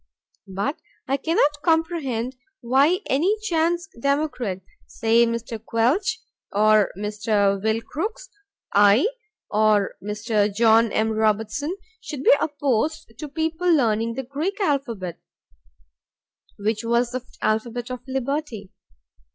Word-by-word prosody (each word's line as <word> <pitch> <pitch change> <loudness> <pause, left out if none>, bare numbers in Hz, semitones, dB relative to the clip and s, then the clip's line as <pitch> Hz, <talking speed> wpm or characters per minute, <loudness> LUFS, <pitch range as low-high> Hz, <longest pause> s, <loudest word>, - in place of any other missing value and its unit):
But 200 +10 -3 0.3
I 270 - +1
cannot 295 0 +1
comprehend 315 -8 0 0.3
why 275 - +3
any 350 +11 +2
chance 345 -2 0
democrat, 280 -9 -1 0.3
say 230 +1 +3
Mr. 230 -1 -4
Quelch, 260 - +1 0.3
or 215 0 +4
Mr. 210 -1 0
Will 220 +2 0
Crooks, 425 - -5 0.5
I 205 - +6 0.5
or 210 -1 +2
Mr. 210 0 0
John 225 +1 +4
M. 220 +1 +1
Robertson, 220 - 0 0.2
should 285 -3 -6
be - - +7
opposed 290 -2 -1
to 300 - -6
people 325 +4 0
learning 230 -6 +2
the 265 - -3
Greek 300 - -3
alphabet, 240 - -2 1.4
which 215 +2 -1
was 235 +1 +1
the 255 -1 -4 0.2
alphabet 235 +3 -1
of 250 - -4
liberty. 265 -6 -3
240 Hz, 110 wpm, -23 LUFS, 215-295 Hz, 1.4 s, be